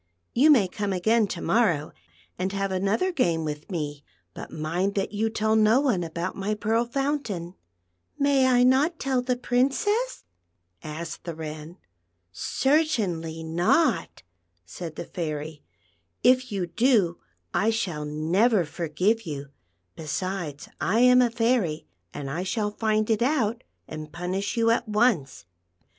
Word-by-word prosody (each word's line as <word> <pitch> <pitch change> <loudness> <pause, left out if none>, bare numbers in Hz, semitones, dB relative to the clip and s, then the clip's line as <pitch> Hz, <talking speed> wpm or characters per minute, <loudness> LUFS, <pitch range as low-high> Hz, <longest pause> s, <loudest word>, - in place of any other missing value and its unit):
You 285 +6 +5
may 240 -11 +6
come 205 +2 -3
again 220 +4 +2
to - - -5
morrow 170 -11 +2 0.5
and 185 +1 -1
have 195 -1 -1
another 200 - +1
game 170 - +1
with 150 0 -5
me, 150 -5 -4 0.3
but - - -8
mind 175 +6 -2
that 195 -1 -1
you 215 +2 0
tell 220 0 +1
no 220 +3 +5
one 245 -11 +1
about 170 +2 -4
my 200 +2 -2
Pearl 225 +2 +1
Fountain." 240 - -2 0.3
" 90 0 -48
May 280 -2 +3
I 245 -1 +4
not 275 +7 +3
tell 265 -3 0
the 250 0 0
Princess 275 - 0 0.2
} 85 0 -49
" 90 0 -35
asked 160 +2 -6
the 170 -2 -5
Wren. 155 +1 -7 0.5
"Certainly 195 - 0
not," 175 - +1 0.4
said 160 - -7
the - - -6
Fairy; 155 -2 -5 0.3
" 85 +1 -45
if 255 0 +4
\'ou 195 -3 -1
do, 210 -4 +2 0.3
I 205 +6 +2
shall 190 -9 -2
never 170 +8 +2
forgive 180 +7 -1
you; 140 -2 -5 0.5
besides, 160 -1 -4
I 215 +6 +2
am 250 0 +7
a 245 - +3
fairy, 225 -9 0 0.3
and 145 -2 -6
I 155 +6 -3
shall 210 +2 -1
find 215 0 0
it 220 - +1
out 240 -3 +1 0.2
and 155 -1 -8
punish 185 +6 -3
you 230 0 +4
at 230 0 0
once." 210 - +1
195 Hz, 150 wpm, -26 LUFS, 160-240 Hz, 0.5 s, am